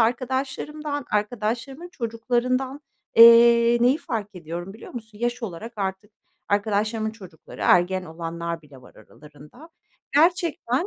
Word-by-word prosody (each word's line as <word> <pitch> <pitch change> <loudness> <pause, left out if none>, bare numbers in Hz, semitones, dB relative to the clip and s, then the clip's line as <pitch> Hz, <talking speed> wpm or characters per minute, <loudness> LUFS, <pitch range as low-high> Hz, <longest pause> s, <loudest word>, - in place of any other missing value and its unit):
arkadaşlarımdan 265 +4 -2
arkadaşlarımın 235 +9 -2
çocuklarından, 255 +1 -2 0.4
eee, 235 0 +8
neyi 255 +5 +4
fark 210 - -5
ediyorum, 175 +2 -7
biliyor 220 - -12
musun? 220 -3 -9
Yaş 240 +1 -2
olarak 220 +3 -6
artık 195 +1 -4 0.4
arkadaşlarımın 215 +2 0
çocukları, 185 -7 -13
ergen 180 +1 +3
olanlar 170 0 -5
bile 140 -3 -16
var - - -17
aralarında, 150 - -16 0.5
gerçekten 330 -2 +2
225 Hz, 110 wpm, -24 LUFS, 190-255 Hz, 0.5 s, eee